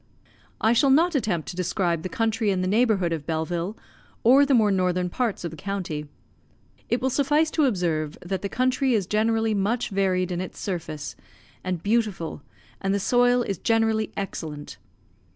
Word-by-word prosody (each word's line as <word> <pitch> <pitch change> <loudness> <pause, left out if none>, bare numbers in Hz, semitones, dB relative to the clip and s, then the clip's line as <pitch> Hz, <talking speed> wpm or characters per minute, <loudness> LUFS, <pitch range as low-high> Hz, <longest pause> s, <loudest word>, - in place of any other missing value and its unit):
I 220 +2 +3
shall 270 +4 +4
not 330 +6 +4
attempt 210 - -1
to - - -6
describe 175 -2 0
the 185 - -4
country 225 +2 0
in 190 -2 +1
the 185 - 0
neighbourhood 205 -5 +2
of 150 -3 -5
Belleville, 170 +5 -2 0.5
or 270 +5 +6
the 275 - +4
more 215 -3 +4
northern 180 -1 0
parts 235 -4 -1
of 170 - -3
the 160 - -10
county. 170 -5 -4 0.8
It 240 - +1
will 265 - +1
suffice 295 +4 +2
to 310 - +2
observe, 170 - -1
that 185 0 -3
the 200 - -3
country 255 +1 +1
is 200 -4 +1
generally 220 +2 +1
much 215 +5 0
varied 185 -2 +1
in 175 0 -2
its 185 - -7
surface, 160 -6 -4 0.5
and 180 -3 -3
beautiful, 205 -8 -1 0.4
and 195 0 +1
the - - 0
soil 245 +3 +3
is 195 -6 -3
generally 225 -1 +1
excellent. 155 -6 -6
200 Hz, 170 wpm, -25 LUFS, 175-230 Hz, 0.8 s, or